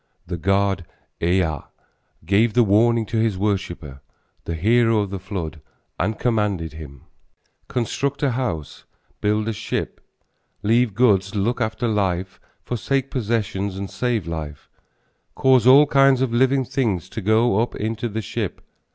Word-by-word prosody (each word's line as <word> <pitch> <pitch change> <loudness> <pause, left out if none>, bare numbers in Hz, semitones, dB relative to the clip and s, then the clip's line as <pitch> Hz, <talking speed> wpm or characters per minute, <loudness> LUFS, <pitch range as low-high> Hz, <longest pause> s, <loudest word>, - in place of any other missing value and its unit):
The 90 0 -4
god 95 +2 +1 0.4
Ea 85 -3 +1 0.7
gave 105 +6 +2
the 120 - +6
warning 115 +2 +3
to 115 - -3
his 110 -4 +1
worshipper, 85 -8 -3 0.4
the 85 - -3
hero 115 +5 +3
of 100 -2 -4
the 100 - -4
flood, 90 -6 -6 0.4
and 110 +1 0
commanded 105 - 0
him: 70 -4 -11 0.6
Construct 140 +4 -2
a 140 - +3
house, 105 - -4 0.4
build 105 +1 +1
a 115 - -1
ship, - - -4 0.6
Leave 115 0 +2
goods, 100 -4 +3
look 115 +5 0
after 110 +2 -1
life, 95 -4 -1 0.2
Forsake 135 +3 -2
possessions, 100 -5 -2
and 100 0 -5
save 110 -1 -1
life, 80 -3 -6 0.6
Cause 130 -3 +4
all 140 +3 +8
kinds 135 -2 +4
of 130 -3 0
living 130 +2 +3
things 120 - -1
to 110 - -5
go 110 +1 +3
up 120 - -1
into 110 +2 -3
the 110 +1 -4
ship. - - -4
105 Hz, 145 wpm, -22 LUFS, 95-120 Hz, 0.7 s, all